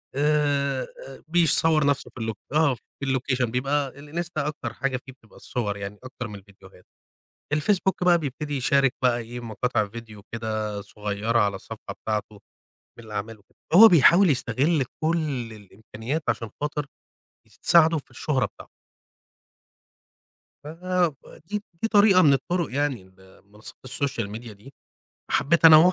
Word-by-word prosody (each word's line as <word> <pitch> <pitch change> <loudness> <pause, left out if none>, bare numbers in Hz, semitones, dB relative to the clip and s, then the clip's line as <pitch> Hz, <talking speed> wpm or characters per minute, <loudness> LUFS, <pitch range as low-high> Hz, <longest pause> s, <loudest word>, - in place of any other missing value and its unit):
آآ، 140 -2 -1
بيصوّر 160 -2 +3
نَفْسُه 145 -1 0
في 120 - -7
اللو 110 0 -2 0.2
آه 150 -3 +3
في - - -22 0.2
الLocation 130 -1 0
بيبقى 140 +3 0
الإنستا 155 0 -4
أكتر 125 -6 -5
حاجة 135 -1 -2
فيه 130 - -10
بتبقى 115 -4 -23
الصور 105 -5 -3
يعني 100 +1 -7
أكتر 130 -2 -7
من 105 - -9
الفيديوهات، 95 -2 -16 0.7
الفيسبوك 185 +4 +1
بقى 175 -1 +5
بيبتدي 145 0 -4
يشارك 135 0 +2
بقى 125 -2 +3
إيه 120 +1 -7
مقاطع 115 -1 -1
فيديو 110 -2 -10
كده 110 -2 -3
صغيّرة 105 +3 -2
على 100 -3 +2
الصفحة - - -9
بتاعته، 105 -1 -3 0.6
من 110 -2 -12
أعمالُه، 110 +1 -5
و 105 - -4
هو 225 +2 +11
بيحاول 175 +2 +6
يستغل 135 +3 +1 0.2
كُلّ 155 -8 -1
الإمكانيات 110 - -6
عشان 115 -2 -1
خاطر، 150 -1 -2 0.8
تساعده 165 -1 +5
في - - -13
الشهرة 135 -5 0
بتاع - - -15 2.0
ف - - -11
ب 175 0 -1 0.3
دي 210 0 -3 0.2
دي 225 - +1
طريقة 205 -3 +6
من 145 - +6
الطرق 165 +3 -1
يعني، 140 -6 -1 0.2
المنصات 100 +3 -13
الSocial 130 -4 -2
media 115 0 -9
دي، 105 +7 -16 0.6
حبيت 170 +3 +2
أنا 160 -1 +11
هو 175 +4 +6
135 Hz, 140 wpm, -25 LUFS, 110-155 Hz, 2.0 s, هو